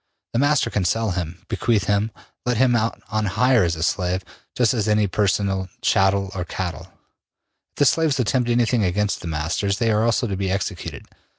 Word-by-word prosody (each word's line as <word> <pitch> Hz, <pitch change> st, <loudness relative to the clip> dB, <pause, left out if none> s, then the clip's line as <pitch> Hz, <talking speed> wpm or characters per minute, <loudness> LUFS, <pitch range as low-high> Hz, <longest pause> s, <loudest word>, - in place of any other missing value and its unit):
The 115 Hz, -, +1 dB
master 145 Hz, +1 st, +2 dB
can 100 Hz, -, 0 dB
sell 110 Hz, +3 st, 0 dB
him, 85 Hz, -1 st, -5 dB
bequeath 110 Hz, -4 st, +1 dB
him, 105 Hz, +1 st, +1 dB, 0.3 s
let 125 Hz, -1 st, 0 dB
him 125 Hz, 0 st, +4 dB
out 115 Hz, 0 st, -1 dB
on 110 Hz, -1 st, 0 dB
hire 120 Hz, +3 st, +3 dB
as 85 Hz, -1 st, 0 dB
a 80 Hz, -, -3 dB
slave, 90 Hz, +1 st, 0 dB, 0.3 s
just 120 Hz, -3 st, +3 dB
as 110 Hz, -3 st, -1 dB
any 105 Hz, 0 st, +3 dB
other 100 Hz, -, 0 dB
personal 95 Hz, -1 st, 0 dB
chattel 95 Hz, 0 st, +2 dB
or 90 Hz, -, -3 dB
cattle. 90 Hz, 0 st, -5 dB, 0.8 s
If -, -, -55 dB
the 145 Hz, -, +3 dB
slaves 155 Hz, -1 st, +2 dB
attempt 125 Hz, 0 st, +1 dB
anything 120 Hz, -1 st, +2 dB
against 100 Hz, +3 st, 0 dB
the -, -, -6 dB
masters, 85 Hz, +6 st, -1 dB
they 115 Hz, 0 st, +1 dB
are 105 Hz, +1 st, +2 dB
also 115 Hz, +1 st, +2 dB
to 100 Hz, -4 st, -2 dB
be 95 Hz, 0 st, -2 dB
executed. 95 Hz, 0 st, -4 dB
105 Hz, 195 wpm, -22 LUFS, 95-115 Hz, 0.8 s, him